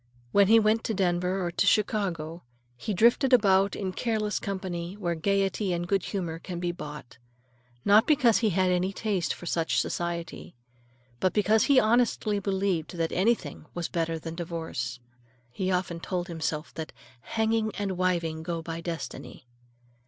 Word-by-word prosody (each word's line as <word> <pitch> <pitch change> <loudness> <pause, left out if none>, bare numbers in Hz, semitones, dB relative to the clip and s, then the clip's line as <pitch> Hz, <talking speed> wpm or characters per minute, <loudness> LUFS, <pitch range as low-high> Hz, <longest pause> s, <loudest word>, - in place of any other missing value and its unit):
When 200 -1 +5
he 225 +2 +7
went 220 +1 +2
to 220 - -1
Denver 180 0 0
or 175 - -2
to 200 - +1
Chicago, 180 -6 0 0.3
he 125 - -4
drifted 235 +6 +4
about 195 -4 +4
in 190 -2 -3
careless 215 -2 -1
company 185 -2 -4
where 180 -5 -2
gayety 195 +2 0
and 175 0 -2
good 195 -1 +1
humor 170 -5 -3
can 175 0 -6
be 175 0 -1
bought, 150 -8 -9 0.7
not 210 +2 +6
because 260 -7 +4
he 225 - +2
had 185 0 +2
any 180 +2 +1
taste 195 -5 -1
for - - -6
such 165 -1 +1
society, 170 -4 -4 0.6
but 185 - +1
because 215 +1 +3
he 280 -3 +6
honestly 220 -2 +2
believed 190 -4 -1
that 165 -1 0
anything 185 -7 0
was 175 -1 -3
better 165 -1 -1
than 160 0 -6
divorce. 160 -8 -4 0.5
He 185 +8 -2
often 180 -2 -1
told 180 +1 -3
himself 160 -2 -3
that 160 -1 -6 0.3
"hanging 220 - 0
and 200 -1 -1
wiving 170 -3 0
go 165 0 -4
by 165 0 -5
destiny." 165 -6 -6
185 Hz, 160 wpm, -27 LUFS, 170-205 Hz, 0.7 s, he